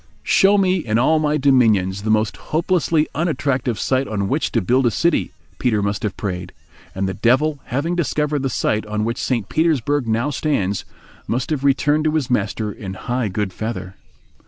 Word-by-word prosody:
"Show 200 +1 +4
me 190 -1 +3
in 115 -10 -1
all 155 +6 +3
my 150 0 +1
dominions 110 -9 +3
the 110 - -3
most 110 0 +2
hopelessly 165 -1 0
unattractive 135 -7 -1
site 130 0 0
on 100 -2 -2
which 145 +9 -1
to 115 - +3
build 125 +6 +2
a - - +4
city," 170 +8 +1 0.3
Peter 110 -5 +1
must 100 0 -1
have 105 -4 -3
prayed; 90 -4 -4 0.4
and 95 0 -1
the 95 - -2
Devil 130 +8 +2
having 145 +7 -1
discovered 150 -3 0
the 135 - -1
site 110 -2 0
on 105 0 -1
which 115 +3 -2
St. 115 -6 -1
Petersburg 145 -4 +1
now 115 +6 0
stands, 105 -10 -1 0.4
must 125 +5 -2
have 145 -3 -1
returned 145 +2 +2
to 155 0 +1
his 135 -5 -1
master 105 -1 -1
in 95 -2 -7
high 120 +3 -2
good 100 -1 -3
feather. 110 -3 -5
125 Hz, 180 wpm, -20 LUFS, 105-150 Hz, 0.4 s, Show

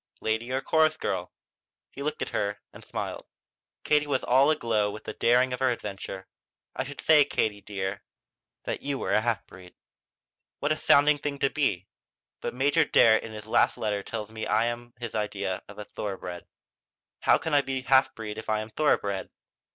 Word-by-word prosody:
"Lady 110 +3 -1
or 130 +1 0
chorus 155 +2 +3
girl?" - - -3 0.6
He 140 - -9
looked 150 +2 -2
at - - -5
her 100 0 -1
and - - -12
smiled. - - -5 0.6
Katie 150 0 +2
was 140 -3 0
all 135 +4 +4
aglow 115 -9 +1
with 105 +1 -8
the - - -6
daring 125 +2 +3
of 125 - -3
her 130 -1 +3
adventure. 100 -4 -5 0.5
"I - - -2
should 145 - -8
say, 155 -2 +6
Katie 105 -7 -1
dear, 95 -1 -4 0.6
that - - -3
you 140 -1 -2
were - - -3
a 110 - +4
half 120 0 -1
breed." 90 -1 -14 0.8
"What 145 - -1
a - - +3
sounding 145 0 +5
thing 145 -1 -3
to 140 -1 +1
be! 100 - 0 0.6
But - - -4
Major 140 +3 +3
Darrett 110 -1 +5
in 110 - -8
his 105 -1 -8
last 110 - +2
letter 105 -1 -1
tells 110 0 -6
me 110 0 -5
I 110 +2 +3
am 120 0 -5
his 120 -2 -5
idea 100 -3 -2
of 100 - -12
a 105 - -6
thoroughbred. 90 -5 -6 0.7
How - - +4
can 160 0 -4
I 145 - +6
be 135 -1 -3
a 130 - -18
half 130 0 +4
breed 110 -1 -6
if 110 - -8
I'm 110 0 -1
a - - -25
thoroughbred?" 100 -9 0
115 Hz, 195 wpm, -27 LUFS, 105-140 Hz, 0.8 s, say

